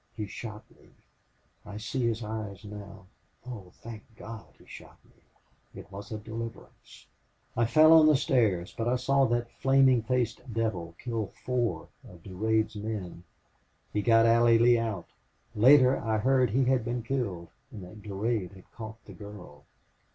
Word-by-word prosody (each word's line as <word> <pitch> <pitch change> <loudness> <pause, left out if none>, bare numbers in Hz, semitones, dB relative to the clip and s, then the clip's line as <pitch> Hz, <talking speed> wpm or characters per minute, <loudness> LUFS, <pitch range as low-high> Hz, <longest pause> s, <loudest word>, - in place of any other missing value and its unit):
He 105 - -3
shot 105 +1 -8
me. - - -22 0.7
I 105 0 -9
see 115 +3 -2
his 115 0 -2
eyes 105 -2 -6
now. 100 -2 -10 0.4
But 125 - -7
oh, 100 -7 -9
thank 115 -2 -8 0.2
God, 115 0 -9
he - - -20
shot - - -13
me! - - -28 0.6
It - - -13
was 100 +3 -9
a 110 - -3
deliverance. 115 - -9 0.5
I 120 - +2
fell 155 +6 +7
on 160 -1 +8
the 155 - +6
stairs, 110 - +1
but 115 - -2
I 125 - +2
saw 135 +2 +2
that 120 0 -1
flaming 135 -2 +4
faced 125 +1 -1
devil 100 -7 -2
kill 115 -4 -3 0.2
four 120 -10 -1 0.2
of 85 -2 -15
Durade's 110 +3 -1
men. 105 -5 -6 0.7
He 105 - +1
got 115 0 +5
Allie 115 0 +5
Lee 120 +1 +5
out. 110 -6 -3 0.5
Later 130 +3 +6
I 110 -1 -1
heard 130 +2 +3
he 130 +5 +2
had 130 -2 +2
been 120 +1 -3
killed 110 -10 -3 0.2
and 100 - -10
that 90 +4 -12
Durade 100 -1 -2
had 95 -1 -17
caught 110 -1 -8
the - - -11
girl. 100 -8 -12
110 Hz, 165 wpm, -28 LUFS, 105-120 Hz, 0.7 s, on